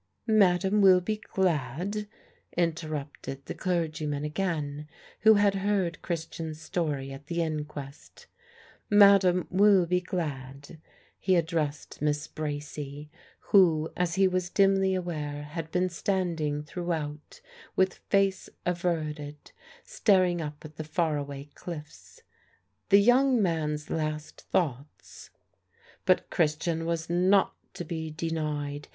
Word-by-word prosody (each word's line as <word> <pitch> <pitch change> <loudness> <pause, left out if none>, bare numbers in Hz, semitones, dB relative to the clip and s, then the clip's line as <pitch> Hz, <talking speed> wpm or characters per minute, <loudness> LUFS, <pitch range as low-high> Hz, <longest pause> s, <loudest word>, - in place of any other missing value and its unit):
"Madame 200 -2 +3
will 190 -2 +7
be 215 +4 -2
glad," 185 - -1 0.5
interrupted 155 -5 -3
the - - -5
clergyman 155 -5 -2
again, 150 -3 -3 0.3
who 220 0 +7
had 205 -1 +4
heard 195 -3 -1
Christian's 160 -2 -5
story 150 -5 -2
at 135 +2 -11
the 170 0 0
inquest, 150 -3 -6 0.6
"Madame 200 -3 +6
will 195 -1 +5
be 180 +1 +1
glad" 145 -5 -5 0.4
he 185 -1 +2
addressed 160 -5 -2
Miss 150 0 0
Bracy, 145 -1 -6 0.4
who, 165 -5 +5
as 175 -2 0
he 195 0 +4
was 185 -1 -1
dimly 195 0 +3
aware, 150 -5 -4
had 155 +2 -6
been 180 +2 +1
standing 170 -5 -1
throughout 155 -3 -5 0.4
with 190 -1 +1
face 195 -1 +2 0.2
averted, 155 -4 -3 0.3
staring 185 - +2
up 150 0 -7
at 155 -1 -11
the 155 - -4
far 155 0 0
away 140 0 -6
cliffs. 155 -4 -10 0.7
"The 200 - +8
young 250 +4 +4
man's 155 -5 -1
last 155 -1 -3
thoughts 145 -4 -3 0.4
" 470 0 -30
But 185 - +2
Christian 165 +1 0
was 165 -1 -2
not 185 +3 +3 0.2
to 175 - -5
be 160 0 -4
denied. 150 -2 -3
165 Hz, 120 wpm, -28 LUFS, 150-185 Hz, 0.7 s, The